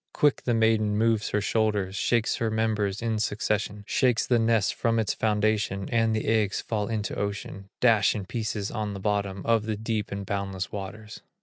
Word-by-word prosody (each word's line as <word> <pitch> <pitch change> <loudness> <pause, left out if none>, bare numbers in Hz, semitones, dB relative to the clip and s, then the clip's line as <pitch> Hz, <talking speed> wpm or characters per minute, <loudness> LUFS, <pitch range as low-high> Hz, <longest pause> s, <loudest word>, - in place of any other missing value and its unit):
Quick 145 -2 +2
the 120 - +2
maiden 110 -2 +2
moves 110 -1 +2
her 105 - 0
shoulders, 105 -3 0
Shakes 115 +2 +1
her 115 -3 0
members 110 -2 0
in 110 -2 0
succession, 105 -1 -1
Shakes 125 +1 +2
the 120 -2 +3
nest 115 -3 +2
from 115 -1 0
its 110 -2 +1
foundation, 105 -2 0
And 115 -1 +2
the 110 - -2
eggs 110 -3 +2
fall 105 -2 -2
into 110 -2 -2
ocean, 100 -1 -4
Dash 110 -4 +4
in 100 -3 -4
pieces 110 -1 -3
on 105 -3 -3
the - - -5
bottom 100 -1 -1
Of 115 -1 +2
the 110 -1 -1
deep 110 -1 -2
and 100 0 -4
boundless 95 -1 -3
waters. 105 +2 -7
110 Hz, 185 wpm, -27 LUFS, 100-115 Hz, -, Dash